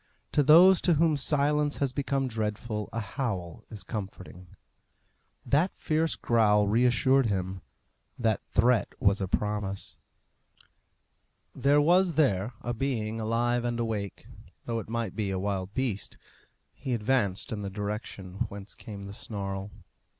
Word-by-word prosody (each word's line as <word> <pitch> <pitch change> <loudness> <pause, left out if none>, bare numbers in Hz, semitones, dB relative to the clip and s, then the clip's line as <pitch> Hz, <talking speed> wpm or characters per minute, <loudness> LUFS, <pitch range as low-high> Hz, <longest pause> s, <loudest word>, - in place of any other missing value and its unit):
To 150 - +3
those 170 +6 +7
to 175 - +3
whom 160 0 +3
silence 145 +1 +1
has 140 -3 0
become 135 -1 0
dreadful 110 -1 -3
a 115 - -3
howl 100 - -4
is 105 -3 -8
comforting. 95 -4 -7 1.0
That 155 +7 +2
fierce 160 +1 +1
growl 105 -3 +3
reassured 125 +4 +3
him; 95 -2 -2 0.6
that 110 -3 +1
threat 120 -2 +2
was 100 0 +2
a 95 - -1
promise. 105 0 -3 1.6
There 145 +1 +3
was 175 +2 +4
there 120 -7 +2
a 120 - -2
being 115 -3 -2
alive 120 +2 0
and 120 -1 -2
awake, 105 -4 -3 0.4
though 115 -1 -2
it 110 - -8
might 115 0 -3
be 105 -3 -1
a 95 - -1
wild 95 0 -3
beast. 125 -7 -2 0.6
He 130 -2 -3
advanced 105 -4 0
in 105 -2 -3
the 100 - -4
direction 100 -2 -4
whence 100 0 -9
came 100 -2 -9
the 100 0 -8
snarl. 100 -2 -5
115 Hz, 135 wpm, -28 LUFS, 100-135 Hz, 1.6 s, those